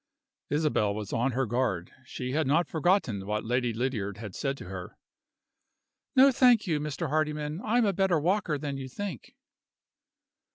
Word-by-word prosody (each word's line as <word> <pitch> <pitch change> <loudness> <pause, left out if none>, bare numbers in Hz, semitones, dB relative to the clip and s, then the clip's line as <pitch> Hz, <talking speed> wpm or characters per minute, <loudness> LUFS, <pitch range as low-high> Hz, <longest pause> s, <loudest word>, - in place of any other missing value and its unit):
Isabel 145 -9 +1
was 105 -2 -5
on 120 +2 +1
her 135 +2 +1
guard: 115 -7 -1
she 125 +1 -5
had 155 +1 +1
not 160 +5 +3
forgotten 160 - +1
what 105 +1 -2
Lady 120 +1 +1
Lydiard 110 -4 -2
had 105 -3 -7
said 135 +5 -2
to - - -9
her. 90 0 -8 1.2
"No, 270 +1 +7
thank 245 -4 +5
you, 160 -5 0
Mr. 150 +2 -3
Hardyman; 150 +2 -1
I 225 +3 +1
am 240 - +4
a 200 - +2
better 190 -3 +2
walker 175 -1 +1
than 140 -1 -4
you 130 -1 -6
think." 185 - -6
140 Hz, 165 wpm, -28 LUFS, 115-170 Hz, 1.2 s, No